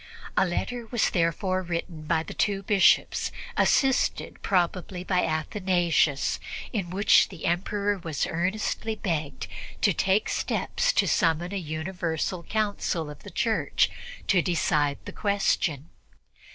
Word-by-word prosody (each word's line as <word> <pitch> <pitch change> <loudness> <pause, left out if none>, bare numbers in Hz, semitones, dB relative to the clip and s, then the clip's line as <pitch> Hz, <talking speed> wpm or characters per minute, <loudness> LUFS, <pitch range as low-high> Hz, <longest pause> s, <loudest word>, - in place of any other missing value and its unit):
A 190 - +3
letter 235 +6 -3
was 235 0 +1
therefore 185 +2 +1
written 170 -2 -4
by 160 -1 +2
the - - -8
two 200 -1 0
Bishops, 195 -1 +3 0.2
assisted 270 -1 +2
probably 180 0 0
by 185 -1 +1
Athanasius, 165 -3 +1 0.3
in 195 -6 -2
which 195 +4 +4
the 185 -5 -8
Emperor 200 +4 0
was 160 -4 -2
earnestly 215 +5 -1
begged 160 -8 -3 0.4
to - - +4
take 195 +3 +2
steps - - 0
to - - +3
summon 170 +2 +1
a - - -1
universal 170 +1 -3
Council 200 -6 -1
of 145 - -12
the 205 - -10
Church 220 +4 +1 0.3
to 185 -3 +4
decide 150 -5 +1
the - - -6
question. 180 -7 0
180 Hz, 125 wpm, -26 LUFS, 165-200 Hz, 0.4 s, which